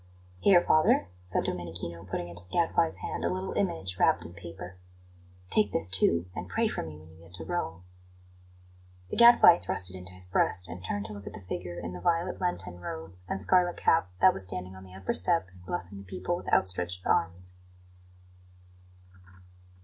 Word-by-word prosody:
"Here, 175 Hz, -, +5 dB
father," 155 Hz, -, +4 dB, 0.2 s
said 90 Hz, -, 0 dB
Domenichino, 85 Hz, -1 st, -5 dB
putting 85 Hz, -, -3 dB
into 85 Hz, 0 st, -3 dB
the -, -, -23 dB
Gadfly's 165 Hz, -, +1 dB
hand -, -, -4 dB
a -, -, +1 dB
little 185 Hz, +1 st, -3 dB
image 165 Hz, -, -2 dB
wrapped -, -, +3 dB
in 85 Hz, -, -9 dB
paper; 90 Hz, +1 st, -9 dB, 0.7 s
"take 105 Hz, -2 st, +3 dB
this, 80 Hz, +1 st, +2 dB
too, 85 Hz, -2 st, +3 dB
and -, -, -6 dB
pray 230 Hz, 0 st, +1 dB
for -, -, -3 dB
me 80 Hz, -2 st, -8 dB
when 80 Hz, +1 st, -15 dB
you 80 Hz, -, -17 dB
get 85 Hz, +1 st, -12 dB
to 80 Hz, -3 st, -8 dB
Rome." 80 Hz, +2 st, -3 dB, 1.3 s
The -, -, -3 dB
Gadfly 235 Hz, -7 st, +8 dB
thrust 90 Hz, 0 st, -1 dB
it -, -, -9 dB
into 90 Hz, 0 st, -10 dB
his 90 Hz, 0 st, -3 dB
breast, 90 Hz, 0 st, +1 dB
and 85 Hz, +2 st, -8 dB
turned 100 Hz, +2 st, -3 dB
to 105 Hz, -, -5 dB
look 100 Hz, -1 st, -10 dB
at -, -, -7 dB
the -, -, -9 dB
figure 90 Hz, -1 st, -5 dB
in 85 Hz, -, -6 dB
the 90 Hz, -, -7 dB
violet 170 Hz, -, 0 dB
Lenten 95 Hz, -, -2 dB
robe 80 Hz, 0 st, -7 dB
and 95 Hz, -, -2 dB
scarlet 175 Hz, -, +3 dB
cap 160 Hz, -, +3 dB
that -, -, +7 dB
was 95 Hz, -, -4 dB
standing 90 Hz, 0 st, -5 dB
on 95 Hz, 0 st, -11 dB
the 95 Hz, 0 st, -13 dB
upper 95 Hz, 0 st, -2 dB
step 170 Hz, -, +1 dB
and 90 Hz, -1 st, -17 dB
blessing 90 Hz, +3 st, -4 dB
the -, -, -10 dB
people 100 Hz, -, -3 dB
with -, -, -6 dB
outstretched 90 Hz, -1 st, 0 dB
arms. 90 Hz, +2 st, 0 dB
90 Hz, 190 wpm, -29 LUFS, 85-105 Hz, 1.3 s, Gadfly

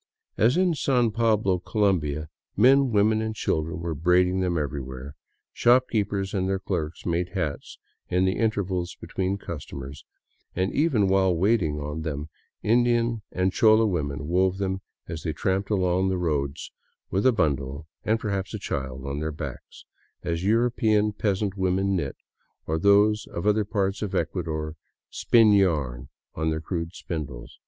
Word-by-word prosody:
As 120 Hz, +8 st, +3 dB
in 185 Hz, -2 st, +3 dB
San 125 Hz, -6 st, +2 dB
Pablo, 105 Hz, -5 st, +2 dB
Colombia, 85 Hz, -8 st, 0 dB, 0.3 s
men, 135 Hz, +5 st, +5 dB
women 110 Hz, +1 st, +3 dB
and 110 Hz, 0 st, -3 dB
children 80 Hz, -4 st, -2 dB
were 85 Hz, -1 st, -2 dB
braiding 90 Hz, +4 st, +2 dB
them 90 Hz, -2 st, 0 dB
everywhere; 70 Hz, -2 st, -5 dB, 0.4 s
shopkeepers 105 Hz, -6 st, +2 dB
and 95 Hz, -2 st, 0 dB
their 95 Hz, -, +1 dB
clerks 85 Hz, -4 st, -4 dB
made 85 Hz, +1 st, -1 dB
hats 75 Hz, -6 st, -3 dB, 0.3 s
in 90 Hz, +1 st, +2 dB
the 95 Hz, -, +1 dB
in 115 Hz, -1 st, +2 dB
tervals 95 Hz, -4 st, -3 dB
between 95 Hz, +1 st, -2 dB
customers, 70 Hz, -6 st, -8 dB, 0.5 s
and 95 Hz, +2 st, 0 dB
even 135 Hz, -10 st, +2 dB
while 95 Hz, -1 st, +3 dB
waiting 85 Hz, -5 st, +1 dB
on 75 Hz, +2 st, -4 dB
them; 75 Hz, -1 st, -4 dB, 0.3 s
Indian 120 Hz, 0 st, +2 dB
and 95 Hz, +1 st, 0 dB
chola 110 Hz, -1 st, +5 dB
women 75 Hz, -7 st, -2 dB
wove 95 Hz, +2 st, +2 dB
them 95 Hz, -1 st, -2 dB, 0.3 s
as 80 Hz, -2 st, -5 dB
they 80 Hz, -1 st, -2 dB
tramped 95 Hz, +3 st, -1 dB
along 95 Hz, -2 st, +1 dB
the 95 Hz, -, 0 dB
roads 75 Hz, -5 st, -2 dB, 0.4 s
with 95 Hz, +3 st, +1 dB
a 130 Hz, -, +6 dB
bundle, 70 Hz, -, -1 dB, 0.2 s
and 110 Hz, +1 st, +1 dB
perhaps 100 Hz, -3 st, -3 dB
a -, -, -2 dB
child, 65 Hz, -1 st, -4 dB
on 70 Hz, +1 st, -3 dB
their 80 Hz, +1 st, -2 dB
backs, 70 Hz, -5 st, -8 dB, 0.4 s
as 85 Hz, -1 st, -2 dB
European 110 Hz, -1 st, +2 dB
peasant 100 Hz, -1 st, -1 dB
women 95 Hz, +1 st, +1 dB
knit, 70 Hz, -7 st, -2 dB, 0.5 s
or 80 Hz, +1 st, -1 dB
those 105 Hz, +3 st, +4 dB
of 85 Hz, -, -5 dB
other 105 Hz, 0 st, +3 dB
parts 100 Hz, -1 st, -1 dB
of 105 Hz, -3 st, -3 dB
Ecuador 80 Hz, -2 st, -2 dB, 0.4 s
spin 115 Hz, -3 st, +4 dB
yarn 70 Hz, -11 st, +1 dB, 0.2 s
on 80 Hz, 0 st, -1 dB
their 80 Hz, 0 st, -1 dB
crude 85 Hz, 0 st, -4 dB
spindles. 70 Hz, -8 st, -6 dB
95 Hz, 155 wpm, -25 LUFS, 80-105 Hz, 0.5 s, a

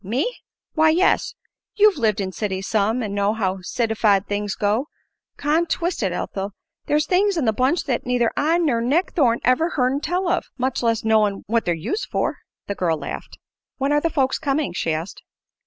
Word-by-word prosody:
"Me!" 260 Hz, -, -1 dB, 0.4 s
"Why, 315 Hz, 0 st, +4 dB
yes. 350 Hz, +4 st, +2 dB, 0.4 s
You've 420 Hz, -6 st, +4 dB
lived 215 Hz, -4 st, +1 dB
in 190 Hz, -1 st, -2 dB
cities 190 Hz, -1 st, -3 dB
some, 220 Hz, +3 st, +1 dB
an' 205 Hz, -2 st, -4 dB
know 200 Hz, +1 st, +1 dB
how 190 Hz, -3 st, -1 dB
citified 215 Hz, -1 st, +1 dB
things 205 Hz, -1 st, -2 dB
go. 215 Hz, +7 st, 0 dB, 0.5 s
Con 315 Hz, +4 st, +1 dB
twist 345 Hz, -2 st, -1 dB
it, 190 Hz, -4 st, 0 dB
Ethel, 195 Hz, +2 st, -4 dB, 0.3 s
there's 300 Hz, +1 st, +2 dB
things 390 Hz, +1 st, +2 dB
in 300 Hz, -, +1 dB
the 220 Hz, -, +2 dB
bunch 260 Hz, +9 st, +1 dB
that 250 Hz, -3 st, -1 dB
neither 245 Hz, -2 st, +1 dB
I 320 Hz, +3 st, +2 dB
ner 285 Hz, -9 st, +1 dB
Nick 290 Hz, +10 st, +1 dB
Thorne 240 Hz, -8 st, +2 dB
ever 255 Hz, +7 st, +3 dB
hearn 255 Hz, +1 st, +2 dB
tell 355 Hz, +4 st, -1 dB
of, 350 Hz, +1 st, 0 dB
much 260 Hz, 0 st, -1 dB
less 230 Hz, -2 st, +1 dB
knowin' 215 Hz, -3 st, +2 dB
what 230 Hz, +2 st, 0 dB
they're 175 Hz, -, +1 dB
used 385 Hz, -, -3 dB
for." -, -, -1 dB, 0.3 s
The 200 Hz, -, -3 dB
girl 170 Hz, -5 st, 0 dB
laughed. 140 Hz, -, -7 dB, 0.4 s
"When 275 Hz, +1 st, 0 dB
are 295 Hz, 0 st, +3 dB
the 330 Hz, -, +1 dB
folks 270 Hz, -4 st, 0 dB
coming?" 285 Hz, -, -1 dB
she 165 Hz, -, -1 dB
asked. 160 Hz, +4 st, -4 dB
240 Hz, 190 wpm, -22 LUFS, 205-305 Hz, 0.5 s, Why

